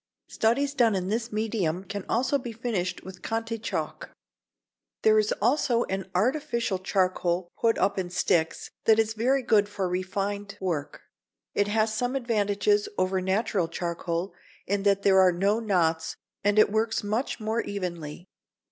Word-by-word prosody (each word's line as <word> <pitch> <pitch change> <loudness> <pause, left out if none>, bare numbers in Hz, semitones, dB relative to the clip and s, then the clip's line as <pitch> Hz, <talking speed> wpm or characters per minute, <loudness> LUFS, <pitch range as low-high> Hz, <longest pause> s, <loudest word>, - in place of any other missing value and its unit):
Studies 275 +6 +1
done 235 -6 +3
in 185 0 -2
this 230 +2 -2
medium 210 -5 -1
can 200 0 -6
also 260 +4 +1
be 245 -2 -6
finished 220 -6 -3
with 185 -1 -10
Conté 225 0 -3
chalk. - - -4 0.9
There 215 0 +6
is 215 0 +1
also 240 +1 +2
an 190 0 -4
artificial 235 -2 0
charcoal 185 -2 0
put 230 -1 +2
up 195 +1 +1
in 180 -2 -3
sticks, 170 -2 0
that 220 -1 +6
is 220 0 +2
very 255 +5 +1
good 210 -4 +3
for 195 -2 -2
refined 200 +3 -3
work. 165 -6 -3 0.5
It 205 - +2
has 215 +1 +1
some 245 +4 -1
advantages 235 - +1
over 185 0 +1
natural 190 -1 0
charcoal, 170 +1 -3 0.3
in 200 +1 0
that 200 0 +2
there 190 -1 +5
are 185 -1 +6
no 200 +5 +1
knots 165 -7 0 0.3
and 205 +1 +2
it 215 - +6
works 220 0 0
much 220 +7 -2
more 220 +1 -1
evenly. 175 -4 -5
205 Hz, 155 wpm, -27 LUFS, 185-225 Hz, 0.9 s, There